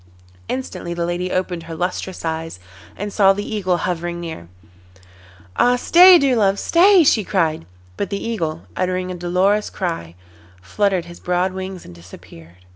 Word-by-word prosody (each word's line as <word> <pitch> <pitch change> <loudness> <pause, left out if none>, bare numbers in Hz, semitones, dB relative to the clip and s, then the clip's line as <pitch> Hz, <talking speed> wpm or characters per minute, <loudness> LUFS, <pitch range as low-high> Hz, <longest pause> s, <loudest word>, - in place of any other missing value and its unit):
Instantly 185 -9 -5
the 170 0 -2
lady 175 +1 -3
opened 180 -2 -2
her 165 - -5
lustrous 180 +1 -4
eyes, 160 - -4 0.4
and 205 0 -5
saw 195 -2 +5
the 205 +1 -5
Eagle 185 -5 -1
hovering 175 0 -3
near. 160 - -7 1.1
'Ah! 245 0 +4
stay, 355 +8 +7
dear 275 -5 +2
love, 200 -3 +2
stay,' 360 - +5
she 225 -7 +3
cried. 160 - -1 0.3
But - - -3
the 200 - -2
Eagle, 165 -8 -3
uttering 185 0 -2
a - - -4
dolorous 185 +4 0
cry, 165 - -5 0.4
fluttered 185 - -1
his 175 0 -12
broad 180 +1 -1
wings 190 -1 -7
and 90 - -12
disappeared. 85 0 -15
180 Hz, 155 wpm, -20 LUFS, 165-200 Hz, 1.1 s, stay